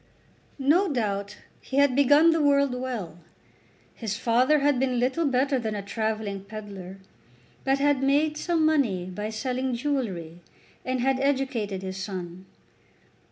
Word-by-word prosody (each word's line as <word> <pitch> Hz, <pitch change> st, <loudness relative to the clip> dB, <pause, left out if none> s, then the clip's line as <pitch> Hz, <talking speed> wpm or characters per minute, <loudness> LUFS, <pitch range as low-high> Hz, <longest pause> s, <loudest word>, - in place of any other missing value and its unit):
No 310 Hz, +7 st, +3 dB
doubt 205 Hz, -5 st, -2 dB, 0.2 s
he 265 Hz, -, -5 dB
had 280 Hz, -2 st, +4 dB
begun 290 Hz, +4 st, +6 dB
the 325 Hz, -1 st, +1 dB
world 280 Hz, -2 st, +3 dB
well. 240 Hz, -10 st, -5 dB, 0.7 s
His 220 Hz, -2 st, -4 dB
father 250 Hz, +6 st, +3 dB
had 285 Hz, -2 st, +2 dB
been 255 Hz, -2 st, 0 dB
little 265 Hz, +7 st, +1 dB
better 270 Hz, +1 st, +1 dB
than 220 Hz, -3 st, -3 dB
a 200 Hz, -, -4 dB
travelling 215 Hz, -1 st, -3 dB
pedlar, 200 Hz, -3 st, -8 dB, 0.7 s
but 270 Hz, 0 st, +2 dB
had 285 Hz, -1 st, +2 dB
made 290 Hz, +3 st, +2 dB
some 325 Hz, 0 st, 0 dB
money 250 Hz, -, +1 dB
by 210 Hz, +4 st, -5 dB
selling 250 Hz, +3 st, -2 dB
jewellery, 205 Hz, -, -3 dB, 0.4 s
and 255 Hz, -1 st, -2 dB
had 265 Hz, +1 st, +1 dB
educated 260 Hz, -8 st, -1 dB
his 190 Hz, 0 st, -5 dB
son. 185 Hz, -2 st, -6 dB
250 Hz, 140 wpm, -26 LUFS, 200-280 Hz, 0.7 s, begun